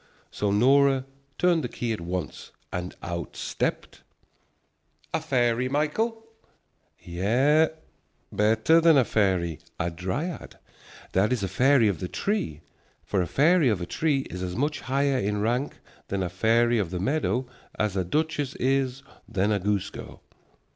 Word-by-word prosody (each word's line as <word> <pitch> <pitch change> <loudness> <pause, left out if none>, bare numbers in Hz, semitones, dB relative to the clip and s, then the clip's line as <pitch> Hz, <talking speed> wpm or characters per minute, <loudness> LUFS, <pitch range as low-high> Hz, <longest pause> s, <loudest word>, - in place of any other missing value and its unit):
So 105 - -1
Nora 135 +5 +4 0.3
turned 175 -3 +2
the 125 - -3
key 115 -1 -3
at 105 - -5
once, 85 -3 -5 0.2
and 90 0 -4
out 85 0 -5
stepped - - -3 0.6
" - - -39
"A 160 - 0
fairy, 125 -4 +1
Michael?" 220 - -1 0.7
Yes, 125 - +2 0.6
better 110 +10 +3
than 165 -2 +6
a 130 - +4
fairy, 95 -7 +1 0.2
a 85 +1 -1
dryad, 95 - -4 0.5
that 100 +4 +2
is 120 -5 0
a - - 0
fairy 125 +4 +4
of 95 -6 -1
the 90 - -3
tree. 90 - -2 0.4
For 95 - 0
a 90 - -1
fairy 155 - +4
of 105 -5 0
a 85 - -4
tree 145 - 0
is 90 -8 -7
as 90 -1 -4
much 145 +4 -1
higher 135 0 0
in 105 -2 -1
rank 120 +6 -1 0.3
than 100 -1 -2
a 90 - -2
fairy 115 +5 +2
of 95 -5 -1
the 90 0 -4
meadow 130 - 0 0.3
as 105 -2 0
a 95 - +1
duchess 145 - -1
is 135 0 0 0.3
than 105 -1 +1
a 105 - +1
goose 100 0 -1
girl. - - -10
115 Hz, 155 wpm, -26 LUFS, 95-140 Hz, 0.7 s, than